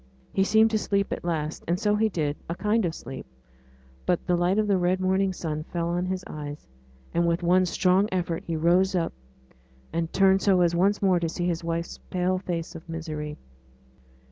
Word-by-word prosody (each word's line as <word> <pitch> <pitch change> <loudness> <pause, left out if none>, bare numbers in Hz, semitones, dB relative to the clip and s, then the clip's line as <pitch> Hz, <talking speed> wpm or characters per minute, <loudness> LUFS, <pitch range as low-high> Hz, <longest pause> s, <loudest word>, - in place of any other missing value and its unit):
He 195 - +3
seemed 220 +2 +4
to 215 - +2
sleep 200 -1 0
at - - -6
last, 160 -3 -2
and 175 +2 +1
so 210 -1 +2
he 220 +1 +2
did 150 -6 -1
a 170 - -2
kind 210 +2 +1
of 165 -1 -2
sleep, 130 - -8 0.8
but 180 - +1
the 180 - +2
light 175 +3 +2
of 215 - +3
the 200 -3 +2
red 180 +1 +1
morning 190 +1 +2
sun 155 -4 -4
fell 170 -1 -2
on 175 +1 -1
his 185 0 -2
eyes, 145 -1 -7 0.5
and 170 0 +2
with 170 +1 0
one 180 +1 +4
strong 185 +3 +2
effort 175 -3 -1
he 165 - -3
rose 180 +4 +3
up, 170 -2 0 0.8
and 165 0 -1
turned 195 0 +4
so 190 -3 +4
as 170 -1 +3
once 195 +4 +2
more 185 -2 +4
to 170 -1 -1
see 175 +2 -3
his 170 -1 -1
wife's 170 0 -3
pale 185 0 0
face 170 -3 -4
of 165 +1 -11
misery. 155 -2 -5
175 Hz, 200 wpm, -26 LUFS, 165-190 Hz, 0.8 s, seemed